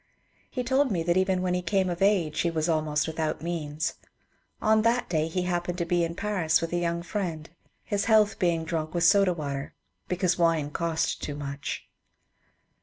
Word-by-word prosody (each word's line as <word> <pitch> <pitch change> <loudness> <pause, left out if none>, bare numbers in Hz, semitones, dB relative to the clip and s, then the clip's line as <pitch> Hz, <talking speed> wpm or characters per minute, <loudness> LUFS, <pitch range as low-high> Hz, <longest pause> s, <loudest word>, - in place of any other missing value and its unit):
He 250 - -3
told 265 +3 +2
me 175 -6 0
that 170 +1 +1
even 185 0 +2
when 180 -1 0
he 180 - 0
came 190 +2 +1
of 175 0 -3
age 190 -6 +2
he 170 - +2
was 160 -1 -1
almost 155 -2 +1
without 160 -1 -2
means. 155 -3 -2 0.7
On 220 0 +3
that 230 +2 +2
day 160 -2 +1
he 180 +2 -2
happened 175 0 -2
to 170 - -1
be 175 0 +1
in 165 0 -2
Paris 190 -5 +1
with 165 +1 -4
a - - +2
young 170 0 -1
friend, 170 -5 -3 0.4
his 205 0 -1
health 215 -2 +4
being 170 -2 +1
drunk 160 0 -3
with 170 - +1
soda 195 +2 +5
water 140 -3 -5 0.3
because 180 -1 0
wine 165 -4 +2
cost 165 0 -1
too 145 - -4
much. 140 -1 -5
170 Hz, 185 wpm, -27 LUFS, 160-185 Hz, 0.7 s, soda